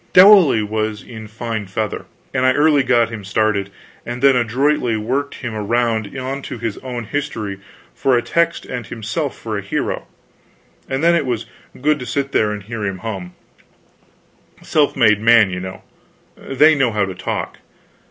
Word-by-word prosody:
Dowley 185 Hz, -, +7 dB
was 110 Hz, 0 st, -2 dB
in 110 Hz, -2 st, -9 dB
fine 110 Hz, -1 st, -5 dB
feather, 105 Hz, +1 st, -3 dB, 0.3 s
and 130 Hz, -1 st, 0 dB
I 130 Hz, 0 st, +4 dB
early 145 Hz, 0 st, +4 dB
got 120 Hz, -3 st, +2 dB
him 110 Hz, -3 st, -6 dB
started, 100 Hz, 0 st, 0 dB, 0.3 s
and 120 Hz, +1 st, -5 dB
then 135 Hz, -1 st, +6 dB
adroitly 125 Hz, 0 st, +1 dB
worked 130 Hz, +6 st, -2 dB
him 125 Hz, -4 st, -6 dB
around 110 Hz, +1 st, -1 dB
onto 130 Hz, 0 st, -5 dB
his 115 Hz, -2 st, -4 dB
own 125 Hz, -2 st, -5 dB
history 110 Hz, -7 st, -4 dB, 0.3 s
for 135 Hz, -3 st, +2 dB
a 120 Hz, -, 0 dB
text 170 Hz, +7 st, 0 dB
and 125 Hz, -3 st, -6 dB
himself 120 Hz, +6 st, -4 dB
for 110 Hz, -2 st, -4 dB
a -, -, -5 dB
hero, 100 Hz, -, -3 dB, 0.8 s
and 135 Hz, +3 st, -2 dB
then 170 Hz, +1 st, +5 dB
it 160 Hz, -5 st, +1 dB
was 120 Hz, -2 st, -2 dB, 0.3 s
good 150 Hz, +3 st, +2 dB
to 125 Hz, -, -7 dB
sit 140 Hz, +3 st, -2 dB
there 105 Hz, -1 st, +2 dB
and 105 Hz, -1 st, -5 dB
hear 110 Hz, +1 st, -5 dB
him 95 Hz, -2 st, -2 dB
hum. 95 Hz, -5 st, -5 dB, 1.3 s
Self 150 Hz, -2 st, +2 dB
made 105 Hz, -5 st, +4 dB
man, 115 Hz, -3 st, +5 dB
you 90 Hz, -, -3 dB
know. 95 Hz, 0 st, -8 dB, 0.5 s
They 150 Hz, +4 st, +3 dB
know 135 Hz, -5 st, +2 dB
how 105 Hz, -2 st, +1 dB
to 95 Hz, -, -5 dB
talk. -, -, -4 dB
115 Hz, 170 wpm, -19 LUFS, 105-135 Hz, 1.3 s, Dowley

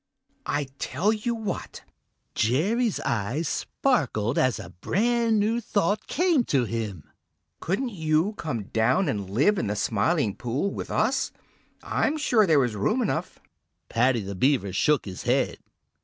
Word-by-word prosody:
I 145 Hz, 0 st, 0 dB, 0.2 s
tell 185 Hz, -, +1 dB
you 230 Hz, +2 st, -2 dB
what!" 220 Hz, -3 st, -5 dB, 0.5 s
Jerry's 195 Hz, -, +1 dB
eyes 115 Hz, +9 st, -1 dB
sparkled 135 Hz, -, 0 dB
as 130 Hz, -5 st, +2 dB
a 85 Hz, -, -9 dB
brand 225 Hz, -, +1 dB
new 225 Hz, +3 st, +1 dB
thought 205 Hz, -1 st, 0 dB
came 340 Hz, -5 st, +2 dB
to 130 Hz, -4 st, +1 dB
him. 110 Hz, -8 st, -4 dB, 0.6 s
"Couldn't 235 Hz, +9 st, -1 dB
you 160 Hz, +2 st, +1 dB
come 150 Hz, -, -4 dB
down 115 Hz, -, +1 dB
and 100 Hz, -3 st, -2 dB
live 150 Hz, -, +3 dB
in -, -, -1 dB
the 105 Hz, -, -1 dB
Smiling 105 Hz, -, +1 dB
Pool 130 Hz, +11 st, -2 dB
with -, -, -6 dB
us? 240 Hz, +5 st, +1 dB, 0.5 s
I'm 305 Hz, +1 st, 0 dB
sure 235 Hz, -8 st, +3 dB
there 145 Hz, -5 st, +4 dB
is 115 Hz, -3 st, -4 dB
room 220 Hz, -, +1 dB
enough!" 215 Hz, -, -2 dB, 0.5 s
Paddy 120 Hz, 0 st, +2 dB
the 100 Hz, 0 st, -5 dB
Beaver 110 Hz, -2 st, +1 dB
shook 150 Hz, +8 st, +2 dB
his 95 Hz, -3 st, -7 dB
head. -, -, 0 dB
150 Hz, 145 wpm, -26 LUFS, -, 0.6 s, there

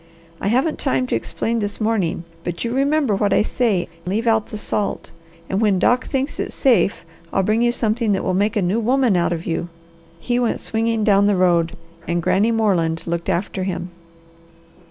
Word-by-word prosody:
I -, -, -2 dB
haven't 260 Hz, +9 st, +1 dB
time 130 Hz, 0 st, +1 dB
to -, -, -1 dB
explain 225 Hz, -, -2 dB
this 205 Hz, -1 st, -3 dB
morning, 215 Hz, -7 st, 0 dB, 0.2 s
but 175 Hz, -1 st, -4 dB
you 235 Hz, 0 st, -2 dB
remember 275 Hz, -2 st, +2 dB
what 200 Hz, 0 st, +1 dB
I -, -, +4 dB
say, 215 Hz, -7 st, 0 dB, 0.2 s
leave 215 Hz, +5 st, -1 dB
out 220 Hz, -2 st, +2 dB
the 215 Hz, -, -6 dB
salt, 210 Hz, -1 st, -3 dB, 0.4 s
and 195 Hz, +3 st, -1 dB
when 205 Hz, -3 st, +3 dB
Doc 245 Hz, +7 st, +2 dB
thinks 270 Hz, +1 st, -2 dB
it's -, -, -3 dB
safe 230 Hz, -, +2 dB, 0.3 s
I'll 195 Hz, -, +1 dB
bring 215 Hz, +4 st, +1 dB
you 240 Hz, 0 st, +3 dB
something 225 Hz, -1 st, 0 dB
that 190 Hz, -, -1 dB
will 185 Hz, -, 0 dB
make 205 Hz, +4 st, +1 dB
a 205 Hz, -, +1 dB
new 190 Hz, +6 st, +1 dB
woman 245 Hz, -2 st, +2 dB
of 170 Hz, -1 st, 0 dB
you." 170 Hz, +1 st, -2 dB, 0.5 s
He 240 Hz, +6 st, -1 dB
went 240 Hz, -2 st, 0 dB
swinging 225 Hz, 0 st, 0 dB
down 200 Hz, -1 st, +4 dB
the 205 Hz, -, +3 dB
road, 175 Hz, -2 st, +2 dB, 0.3 s
and 170 Hz, 0 st, 0 dB
Granny 195 Hz, +6 st, +2 dB
Moreland 185 Hz, -8 st, +1 dB
looked 170 Hz, 0 st, -3 dB
after 190 Hz, +1 st, -1 dB
him. 185 Hz, -1 st, -3 dB
210 Hz, 190 wpm, -20 LUFS, 180-230 Hz, 0.5 s, I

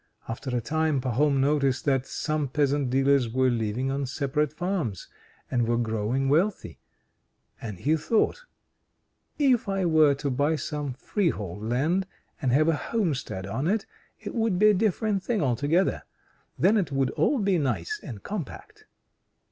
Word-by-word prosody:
After 120 Hz, +4 st, -5 dB
a -, -, -1 dB
time 155 Hz, +3 st, 0 dB
Pahom 135 Hz, +3 st, +1 dB
noticed 140 Hz, -1 st, +1 dB
that 135 Hz, -2 st, +1 dB
some 155 Hz, -2 st, -2 dB
peasant 140 Hz, 0 st, +1 dB
dealers 135 Hz, -1 st, +3 dB
were 130 Hz, +2 st, +2 dB
living 115 Hz, +3 st, -1 dB
on 140 Hz, 0 st, -2 dB
separate 140 Hz, +2 st, -1 dB
farms, 165 Hz, -, -3 dB, 0.4 s
and 120 Hz, -3 st, +1 dB
were 120 Hz, 0 st, +1 dB
growing 115 Hz, +3 st, -1 dB
wealthy; 175 Hz, +9 st, 0 dB, 0.8 s
and 105 Hz, -5 st, -6 dB
he 150 Hz, -, +1 dB
thought: 225 Hz, -, 0 dB, 0.9 s
"If 260 Hz, -8 st, +2 dB
I 195 Hz, -1 st, 0 dB
were 155 Hz, -4 st, +5 dB
to 140 Hz, 0 st, -3 dB
buy 145 Hz, +5 st, +1 dB
some 145 Hz, -1 st, -4 dB
freehold 110 Hz, -, -2 dB
land, 155 Hz, +11 st, 0 dB, 0.3 s
and 130 Hz, -4 st, +1 dB
have 155 Hz, +5 st, +4 dB
a 165 Hz, -, +3 dB
homestead 145 Hz, -, -2 dB
on 120 Hz, +10 st, -2 dB
it, 210 Hz, +3 st, 0 dB, 0.3 s
it -, -, -7 dB
would 225 Hz, -5 st, +1 dB
be 215 Hz, +2 st, +6 dB
a -, -, +2 dB
different 205 Hz, 0 st, 0 dB
thing, 225 Hz, +2 st, -1 dB
altogether. 145 Hz, +9 st, +1 dB, 0.6 s
Then 210 Hz, +4 st, +4 dB
it 185 Hz, -7 st, 0 dB
would 135 Hz, -1 st, +1 dB
all 290 Hz, -, +1 dB
be 195 Hz, -5 st, +2 dB
nice 120 Hz, -, -2 dB
and 115 Hz, -8 st, -9 dB
compact." 195 Hz, -, -7 dB
145 Hz, 155 wpm, -26 LUFS, 130-180 Hz, 0.9 s, be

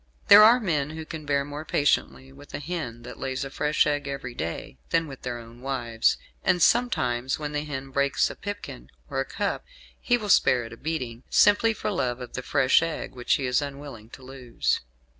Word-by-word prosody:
"There 205 Hz, -, +11 dB
are 230 Hz, +4 st, +7 dB
men 155 Hz, -, -1 dB
who 160 Hz, 0 st, -7 dB
can 155 Hz, -2 st, -8 dB
bear 140 Hz, -1 st, +1 dB
more 145 Hz, +1 st, -6 dB
patiently 140 Hz, -3 st, 0 dB
with 145 Hz, +1 st, -11 dB
a -, -, -4 dB
hen 145 Hz, -7 st, -5 dB
that -, -, -10 dB
lays 135 Hz, 0 st, -3 dB
a 135 Hz, -, -7 dB
fresh 150 Hz, +2 st, +2 dB
egg 145 Hz, -1 st, -1 dB
every 135 Hz, -3 st, -5 dB
day 80 Hz, -, -5 dB
than 165 Hz, 0 st, +2 dB
with 135 Hz, -2 st, -10 dB
their 125 Hz, -1 st, -4 dB
own 115 Hz, +1 st, -12 dB
wives; 120 Hz, -4 st, 0 dB, 0.3 s
and 180 Hz, -, +2 dB
sometimes 130 Hz, -, +2 dB
when 150 Hz, -1 st, -4 dB
the 145 Hz, 0 st, -2 dB
hen 135 Hz, -2 st, -6 dB
breaks 140 Hz, +1 st, +2 dB
a -, -, -9 dB
pipkin 205 Hz, 0 st, -7 dB, 0.2 s
or -, -, -1 dB
a -, -, 0 dB
cup -, -, -3 dB, 0.4 s
he 245 Hz, -, +2 dB
will 215 Hz, -3 st, -6 dB
spare 125 Hz, -9 st, +4 dB
it 115 Hz, -, -9 dB
a -, -, -11 dB
beating, 125 Hz, -7 st, -4 dB
simply 205 Hz, +2 st, +5 dB
for 215 Hz, -, -3 dB
love 125 Hz, -9 st, -1 dB
of 125 Hz, -, -8 dB
the 125 Hz, -, -3 dB
fresh 130 Hz, +2 st, +3 dB
egg 165 Hz, -1 st, -4 dB
which 125 Hz, -1 st, +1 dB
he 135 Hz, -, -2 dB
is 125 Hz, +2 st, +2 dB
unwilling 140 Hz, -6 st, -8 dB
to 130 Hz, -, -13 dB
lose. 130 Hz, -2 st, -2 dB
140 Hz, 210 wpm, -26 LUFS, 125-155 Hz, 0.4 s, There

